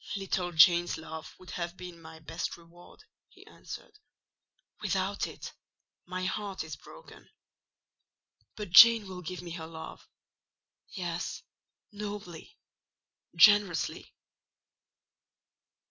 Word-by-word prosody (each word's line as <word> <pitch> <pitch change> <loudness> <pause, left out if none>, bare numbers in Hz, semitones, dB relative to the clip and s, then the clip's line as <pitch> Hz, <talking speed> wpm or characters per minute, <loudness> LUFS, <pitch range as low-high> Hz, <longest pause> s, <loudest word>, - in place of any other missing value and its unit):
"Little 190 -2 -2
Jane's 170 +2 +5
love 160 0 -9
would 185 - -12
have 175 +1 -5
been 180 -2 -10
my 160 0 -12
best 165 +2 -5
reward," 170 - -17 0.3
he - - -18
answered; 425 - -11 0.8
"without - - -1
it, - - -9 0.5
my 185 0 -4
heart 195 -1 -3
is 160 - -7
broken. - - -15 1.3
But 210 -4 -7
Jane 230 +2 +9
will 185 -1 -8
give 180 +1 -6
me 170 - -8
her 165 -1 -6
love: 160 -1 -10 0.8
yes—nobly, 185 +1 -7 0.8
generously." 205 0 +4
175 Hz, 100 wpm, -30 LUFS, 165-195 Hz, 1.3 s, Jane